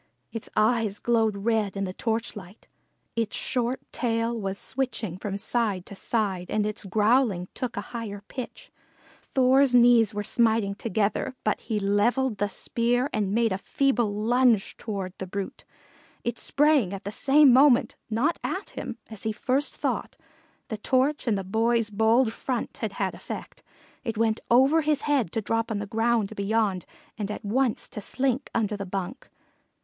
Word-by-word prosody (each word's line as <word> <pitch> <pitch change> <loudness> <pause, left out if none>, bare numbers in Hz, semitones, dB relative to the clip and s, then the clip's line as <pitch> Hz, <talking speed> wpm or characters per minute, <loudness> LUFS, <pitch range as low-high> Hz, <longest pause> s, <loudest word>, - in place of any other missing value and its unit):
Its 225 - -6
eyes 215 -1 +2
glowed 225 -3 +1
red 210 -1 0
in 195 - -1
the 185 -1 -3
torchlight. 220 -3 -4 0.5
Its 230 -2 -1
short 250 +1 -1
tail 230 -1 0
was 195 -3 -3
switching 250 -9 -3
from 195 +1 -4
side 205 -3 -1
to - - -10
side 195 -3 -1
and 210 -1 0
its 215 0 -4
growling 210 -1 +2
took 250 -4 -4
a - - 0
higher 205 -4 -5
pitch. 255 -3 -8 0.5
Thor's 260 0 +3
knees 240 -3 +6
were 205 -1 -3
smiting 220 -2 +2
together, 220 +4 -1
but - - 0
he 220 -3 -2
levelled 210 +4 +1
the 205 - +1
spear 240 +6 0
and 205 -3 0
made 225 -1 +2
a 190 - -3
feeble 245 -3 +1
lunge 225 +1 +2
toward 195 -4 -4
the 190 - -5
brute. 195 +1 -5 0.6
It 235 - -2
sprang 285 -9 +3
at 195 - -9
the 200 - -4
same 275 +3 +5
moment, 265 -1 +5
not 255 +10 +1
at 385 +2 -3
him, - - -6
as 220 - -7
he 220 - -1
first 260 +6 -1
thought - - -2 0.5
the 220 - -3
torch 265 +5 +1
and 215 -3 +2
the 195 - -3
boy's 225 +3 +1
bold 225 +3 +3
front 250 -1 -3
had - - -3
had - - -2
effect - - -8 0.4
it 225 -4 -3
went 220 0 +1
over 270 +7 +5
his 300 -2 +1
head 275 - +1
to 225 - 0
drop 225 +2 -1
on 220 - -1
the 205 - -3
ground 225 0 0
beyond 200 -3 0 0.3
and 205 -1 -2
at 210 - -6
once 245 +3 0
to 210 - -6
slink 265 +4 -1
under 215 -2 0
the 200 -1 -6
bunk. 195 +6 -5
225 Hz, 165 wpm, -26 LUFS, 205-245 Hz, 0.6 s, knees